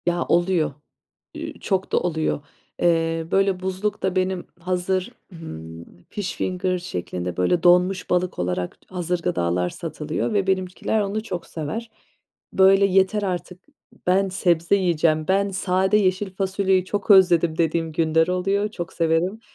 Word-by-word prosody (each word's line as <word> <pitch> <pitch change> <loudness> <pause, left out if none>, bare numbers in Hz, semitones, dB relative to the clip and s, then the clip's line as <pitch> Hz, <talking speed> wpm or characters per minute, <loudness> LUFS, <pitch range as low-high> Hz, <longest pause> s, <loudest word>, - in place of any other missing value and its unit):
Ya, 175 0 0
oluyor, 175 -3 +1 0.6
ü - - -7
çok 190 -1 -1
da - - +4
oluyor. 160 -4 -1 0.4
Eee, 165 -1 +1
böyle, 195 -1 +2
buzlukta 190 0 -2
benim 185 -1 -1
hazır, 185 +2 -1 0.2
ımm, 80 - -9 0.3
fish 205 -3 -4
finger 185 0 -1
şeklinde, 90 - -5
böyle, 160 - +1
donmuş 180 +2 +3
balık 180 0 0
olarak 90 0 -3
t - - -21
hazır 180 0 -1
gıdalar 90 - 0
satılıyor 155 - -4
ve 200 -2 +1
benimkiler 190 +3 0
onu 205 +1 -2
çok 180 -6 -5
sever. 170 +9 -5 0.6
Böyle, 195 +1 +5
"Yeter 195 +2 +2
artık, 180 -1 -4 0.5
ben 190 +2 +3
sebze 175 -1 +2
yiyeceğim, 165 -4 +1
ben 200 +1 +2
sade 190 +1 +1
yeşil 190 -1 +1
fasulyeyi 190 -1 +1
çok 205 +2 -4
özledim." 175 -4 +5
dediğim 165 -1 0
günler 160 +1 +2
oluyor, 195 +3 0
çok 175 -6 -6
severim. 170 +5 0
180 Hz, 140 wpm, -23 LUFS, 165-190 Hz, 0.6 s, Böyle